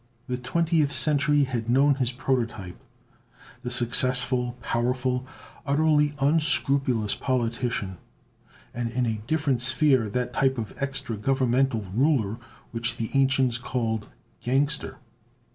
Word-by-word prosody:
The 125 - -3
Twentieth 155 +3 0
Century 145 +2 +5
had 120 -4 -3
known 140 +4 +4
his 130 -3 -1
prototype, 120 -7 -3 0.8
the 125 - -5
successful, 125 0 +2
powerful, 125 +2 -2 0.4
utterly 150 0 +1
unscrupulous 135 -6 +1
politician; 115 -6 -3 0.7
and 120 -1 -3
in 125 +2 -1
a 110 -2 -3
different 145 -5 0
sphere, 130 -3 +4
that 125 +3 -3
type 130 0 +1
of 110 -2 -5
extra 135 -5 -4
Governmental 130 -1 0
ruler 120 -4 +1 0.3
which 115 0 -2
the 115 -1 -4
ancients 135 -3 +2
called 115 -4 -3 0.3
"gangster." 140 +4 -1
125 Hz, 110 wpm, -25 LUFS, 120-140 Hz, 0.8 s, Century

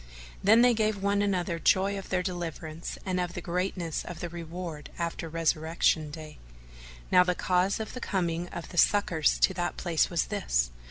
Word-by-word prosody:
Then 220 +5 +6
they 245 -1 +6
gave 215 -2 +1
one 200 0 +2
another 180 -4 0
joy 190 +5 +3
of 195 - -7
their 180 -1 0
deliverance 170 -3 -5
and 185 -1 -1
of 175 -1 -2
the - - -3
greatness 175 -2 -2
of 175 -2 -8
their 175 - -5
reward 170 -2 -7
after 170 -1 -3
Resurrection 160 -1 +1
Day. 155 0 -9 0.7
Now 180 - +7
the 180 0 0
cause 185 +3 +1
of 220 - -5
the 250 - -7
coming 175 -4 -1
of 170 - -7
the 175 - 0
succours 180 -7 +3
to 190 - +3
that 175 -1 -2
place 170 -3 +1
was 170 -2 0
this. - - 0
175 Hz, 180 wpm, -28 LUFS, 165-190 Hz, 0.7 s, Now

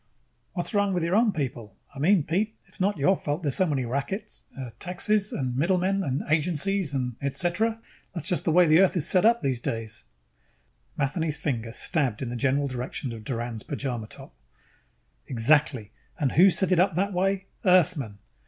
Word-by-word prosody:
"What's 175 +2 -2
wrong 205 -1 +2
with 175 - 0
your 170 +3 +1
own 225 0 +4
people? 125 - -5 0.2
I 140 - -9
mean, 175 +3 +4
Pete, 205 +9 -1
it - - -28
is - - -9
not 200 0 +1
your 170 +7 +3
fault 150 0 -3
there 145 - +1
are - - 0
so 185 +7 +2
many 135 -5 -1
rackets 140 - -4
uh, 130 -3 -6
taxes 200 +3 +1
and 130 -3 -2
middlemen 185 +6 +1
and 140 0 -2
agencies 165 +1 0
and 125 -3 -2
et 140 -1 -2
cetera. 220 +6 0 0.4
That 170 - -4
is - - -9
just 180 - -1
the 165 - +2
way 175 +2 +6
Earth 190 -1 +4
is 155 - -1
set 185 +1 +3
up 235 +1 +3
these 130 -3 0
days." 115 - -4 0.9
Matheny's 150 +2 -1
finger 115 -6 -3
stabbed 135 - 0
in 125 - -4
the 120 - -4
general 140 +4 +1
direction 125 0 -5
of 110 -1 -9
Doran's 120 -1 -4
pajama 125 -5 -4
top. - - -12 0.9
"Exactly. 130 -3 +2 0.3
And 145 -7 0
who 185 +5 +6
set 190 +1 0
it 180 - +4
up 185 -2 +3
that 200 +3 0
way? 195 +1 0 0.2
Earthmen. 175 - +3
155 Hz, 190 wpm, -26 LUFS, 130-185 Hz, 0.9 s, way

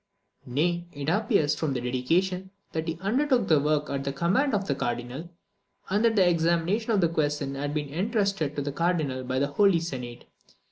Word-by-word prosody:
Nay, 170 +7 0
it 145 0 -3
appears 200 - +2
from 150 -2 -1
the 125 - -1
dedication, 170 +10 0 0.2
that 160 +1 -3
he 165 0 -2
undertook 245 +2 +2
the 155 -3 +5
work 150 +1 +1
at 140 -1 -2
the 140 - -2
command 200 - +1
of 200 -1 -1
the 140 - 0
Cardinal, 125 +5 -4 0.6
and 205 +3 +2
that 230 -1 +3
the 190 -3 +5
examination 170 +6 +1
of 205 -3 +3
the 170 - +4
question 145 -3 -1
had 145 +1 -3
been 145 -2 -3
entrusted 195 - 0
to 145 - -2
the 145 - -3
Cardinal 155 -5 0
by 130 +1 -2
the 140 - +2
Holy 180 +5 +3
Senate. 125 -7 -6
160 Hz, 190 wpm, -27 LUFS, 140-190 Hz, 0.6 s, the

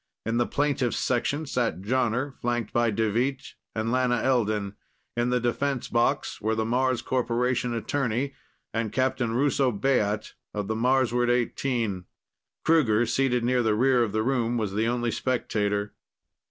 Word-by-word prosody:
In 115 +1 0
the 120 - +2
plaintiff's 140 -4 0
section 130 +5 0
sat 120 - -1
Jonner, 125 +4 0
flanked 120 -2 -2
by 120 0 +3
Deveet 115 +6 -1 0.2
and 110 +1 -1
Lana 125 -1 +2
Elden. 110 -6 0 0.4
In 120 +1 +1
the 125 0 +2
defense 125 +2 -1
box 120 +2 0
were 110 +1 0
the 110 0 0
Mars 125 +1 +1
Corporation 125 -1 0
attorney 135 +2 -1 0.4
and 115 -2 -1
Captain 130 -3 0
Russo 135 0 +2
Baat 105 -2 0 0.2
of 105 -2 -2
the 110 - 0
Marsward 125 0 +2
XVIII. 120 -5 0 0.6
Kruger, 120 -9 +4
seated 125 +1 +1
near 125 +1 +2
the 110 -2 +2
rear 125 +2 +3
of 115 -3 +1
the 110 +1 0
room, 120 -2 0
was 105 -4 -2
the 110 +2 +1
only 120 0 0
spectator. 105 -4 -1
120 Hz, 150 wpm, -26 LUFS, 110-130 Hz, 0.6 s, Kruger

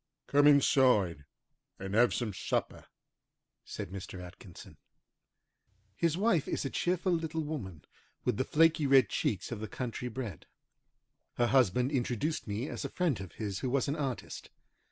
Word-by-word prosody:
"Come 145 +1 +4
inside 125 - +4 0.5
and 95 0 -6
have 120 +3 +5
some 115 -4 -2
supper," - - -3 0.8
said - - -7
Mr. 95 -1 -7
Atkinson. 90 0 -12 1.2
His 165 +4 +1
wife 200 -7 +2
is - - -2
a 135 - -3
cheerful 180 +1 0
little 160 -1 -1
woman, 100 - -6 0.4
with - - +1
the - - +1
flaky 160 +1 +3
red 135 -6 +5
cheeks 100 +1 -2
of 115 - -4
the 110 - -5
country 125 +1 -5
bred. 120 -8 -6 0.9
Her 120 - +2
husband 125 0 +3
introduced 135 +3 -1
me 105 +6 -3
as - - -5
a - - -3
friend 165 - 0
of 95 - -9
his 100 -4 -4
who 130 - -2
was 135 +2 +1
an 140 - -1
artist. 135 -5 -5
125 Hz, 155 wpm, -31 LUFS, 100-150 Hz, 1.2 s, have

